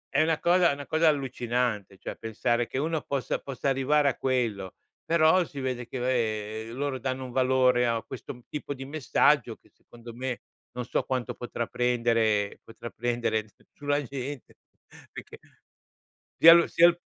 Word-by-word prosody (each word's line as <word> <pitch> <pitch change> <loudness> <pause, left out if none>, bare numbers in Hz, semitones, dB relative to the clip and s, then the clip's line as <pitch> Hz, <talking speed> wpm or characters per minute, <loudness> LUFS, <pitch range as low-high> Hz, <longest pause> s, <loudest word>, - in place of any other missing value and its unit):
È 145 - +5
una 160 0 +1
cosa 175 +1 +4
è - - +1
una 140 0 -7
cosa 160 +2 +2
allucinante, 125 -8 -1
cioè - - -7
pensare 120 +2 -1
che - - -5
uno 160 +2 -1
possa 140 -2 -2
possa 135 0 -3
arrivare 140 +2 +2
a 130 - -3
quello, 115 -8 -2 0.3
però 165 +2 +4
si 145 -4 -9
vede 125 -2 -3
che, 130 - -6
vabbè, 110 -3 -1
loro 135 +1 -3
danno 130 +1 -3
un 125 - -8
valore 130 -1 +3
a 115 -1 +1
questo 130 0 -8
m 125 - -16
tipo 145 -1 -5
di 135 0 -8
messaggio 145 -1 +2
che, - - -28
secondo 120 0 -13
me, 125 0 -4 0.3
non 125 -1 -4
so - - 0
quanto 130 -3 -3
potrà 120 -1 -4
prendere 115 -4 +1
potrà 115 +1 -10
prendere 120 -2 -1
s 105 - -28 0.2
sulla 145 0 -1
gente, 135 0 -7 0.6
perché - - -10 1.0
sia 165 +1 +11
il 170 0 +4
sia 170 +1 +6
s 170 - -14
130 Hz, 170 wpm, -27 LUFS, 120-145 Hz, 1.0 s, sia